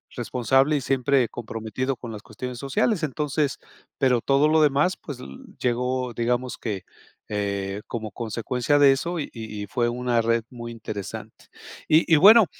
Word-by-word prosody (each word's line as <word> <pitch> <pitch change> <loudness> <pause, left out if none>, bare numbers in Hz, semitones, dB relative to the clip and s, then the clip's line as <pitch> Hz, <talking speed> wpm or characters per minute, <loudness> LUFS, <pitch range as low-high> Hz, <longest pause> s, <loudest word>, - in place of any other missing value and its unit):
responsable 130 +4 +2
y 145 - 0
siempre 135 0 +2
comprometido 115 +3 -4
con 120 -1 -8
las 105 -2 -8
cuestiones 125 +3 -7
sociales. 150 - 0
Entonces 150 0 -1 0.4
pero 125 -4 +3
todo 140 +4 +3
lo 160 +1 +4
demás, 150 +5 +2
pues, 140 -5 -8
l - - -8 0.3
llegó, 125 0 -1
digamos 120 +1 -1
que, 105 -5 -4 0.4
eh, 100 -1 -2
como 110 -2 -5
consecuencia 120 +5 0
de 140 -1 +7
eso 170 +6 -3
y 145 - -4
y 110 -3 -7
y - - -7
fue 120 +4 0
una 120 -1 0
red 115 0 +2
muy 120 -1 -7
interesante. 105 -3 -7 0.4
Y 160 +2 +4
y - - +9
bueno, 210 +7 +9
125 Hz, 160 wpm, -24 LUFS, 115-140 Hz, 0.4 s, y